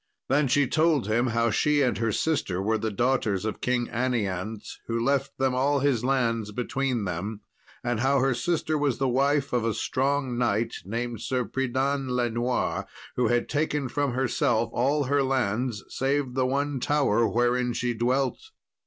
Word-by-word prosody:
Then 140 +2 +3
she 140 +2 +3
told 155 -1 +2
him 115 +4 +1
how 115 0 +1
she 145 +6 +2
and 125 - +1
her 115 -1 +1
sister 105 - 0
were 110 +3 0
the 110 - -1
daughters 110 -3 0
of 110 - -4
King 125 -1 0
Anianse, 110 -4 -2
who 115 0 -1
left 135 +2 0
them 130 -1 +1
all 140 +2 +2
his 135 -5 +1
lands 115 -5 0
between 125 0 -1
them; 100 +5 -4 0.4
and 120 -2 -1
how 135 +3 +3
her 135 0 +2
sister 155 +3 -1
was 145 -4 +1
the 135 - +1
wife 140 +2 +1
of 120 -2 +1
a 115 -1 0
strong 135 -2 0
knight, 115 -1 +1
named 115 +2 -3
Sir 125 -2 -1
Pridan 135 +2 -1
le 120 -1 +1
Noir, 120 +2 -1 0.3
who 125 -2 +2
had 120 0 +1
taken 150 -2 -1
from 140 +1 -1
herself 120 -3 +1
all 140 +4 +1
her 140 +1 +1
lands, 125 -4 0
save 135 -1 -1
the 130 0 +1
one 140 +1 -1
tower 125 -5 +2
wherein 120 +1 +1
she 120 0 -1
dwelt. 125 +3 0
125 Hz, 170 wpm, -26 LUFS, 115-135 Hz, 0.4 s, Then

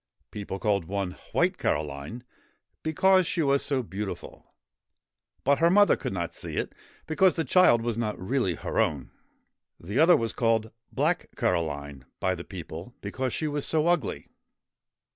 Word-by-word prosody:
People 100 -2 -5
called 100 -4 0
one 100 0 -2 0.2
'White - - +1
Caroline,' 70 - -2 0.6
because 185 +3 +3
she 170 - 0
was 140 -1 +2
so 135 -3 0
beautiful. 100 0 -7 0.9
But 140 +1 +3
her 165 +1 +5
mother 205 +3 +6
could - - -4
not 85 -2 -3
see - - -5
it, - - -2 0.3
because 180 +3 +3
the 165 - 0
child 155 -11 +5
was 115 -1 -1
not 110 -3 -2
really 95 -2 0
her - - -3
own. 70 -4 0 0.7
The 100 +9 -3
other 170 +2 +7
was 115 -1 -2
called 115 -2 +1
' - - -50
Black - - 0
Caroline 70 -6 -1
' - - -60
by 95 - +1
the 85 -2 -6
people, 90 +4 -8
because 130 -1 -3
she 155 - -2
was 145 -1 -2
so 155 -1 +2
ugly. 175 0 0
115 Hz, 160 wpm, -27 LUFS, 90-150 Hz, 0.9 s, other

